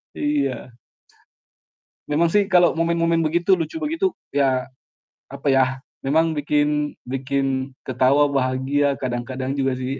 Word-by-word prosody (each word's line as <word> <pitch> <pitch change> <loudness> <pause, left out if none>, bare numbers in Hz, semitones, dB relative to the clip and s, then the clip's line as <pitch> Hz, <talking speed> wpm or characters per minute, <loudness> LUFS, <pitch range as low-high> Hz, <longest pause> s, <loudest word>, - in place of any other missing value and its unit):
Iya. 140 -4 -1 1.4
Memang 155 +3 +2
sih 205 +4 +3
kalau 175 -2 +5
momen-momen 165 0 +1
begitu 170 +4 +2
lucu 175 - -4
begitu 330 +5 0 0.2
ya, 130 -3 +1 0.7
apa 140 +1 -3
yah, 135 -1 +4 0.4
memang 160 +3 +2
bikin 150 0 0 0.2
bikin 135 0 -2 0.2
ketawa, 140 +3 +3
bahagia 135 +1 0
kadang-kadang 130 +2 -3
juga 135 -1 0
sih. 130 +2 -3
145 Hz, 115 wpm, -22 LUFS, 135-165 Hz, 1.4 s, kalau